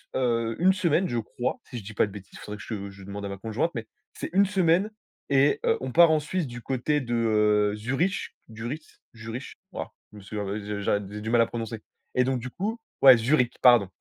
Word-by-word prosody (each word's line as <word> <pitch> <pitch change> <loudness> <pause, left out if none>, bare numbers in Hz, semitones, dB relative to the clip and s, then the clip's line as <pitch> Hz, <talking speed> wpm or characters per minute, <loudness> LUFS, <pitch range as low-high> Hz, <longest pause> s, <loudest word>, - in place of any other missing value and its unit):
s - - +1
heu, 115 -2 0
1 185 +3 +5
semaine, 185 -2 +1
je 120 - 0
crois, 120 +2 -3
si 125 - -6
je - - -12
dis 105 +2 -9
pas 105 - +2
de - - -11
bêtises. 95 -1 -11
Faudrait 105 0 -7
que 105 - -10
je 100 -3 -5
je 100 0 -13
demande 100 +1 -7
à - - -4
ma 100 - -5
conjointe 110 - -1
mais 115 -2 -4 0.3
c'est - - -6
1 200 +2 +5
semaine 185 0 +2 0.4
et 140 +1 +4
heu, - - +3
on 130 - -4
part 170 +4 +7
en 155 - +4
Suisse, 155 +2 -2
du 120 0 -8
côté 135 +4 0
de, 120 -2 -4
heu, 105 -2 +3
Zurich, 135 - -1 0.2
Duritz, 120 +8 -7
Jurich. 115 +3 -7 0.2
Wouah, - - -6 0.2
je 105 - -13
me - - -10
souviens, 105 +1 -4
heu, 100 +2 -3
je 105 0 -5
j'a 100 - +1
j'ai 105 +1 -7
du 110 - -4
mal 120 -1 +5
à - - +5
prononcer 115 -1 -5 0.4
et 125 - +4
donc 130 -1 0
du 125 +2 -6
coup 210 - -3 0.2
ouais, 135 -2 +10
Zürich, 125 +1 +2
pardon 120 -6 +7
120 Hz, 240 wpm, -26 LUFS, 105-145 Hz, 0.4 s, ouais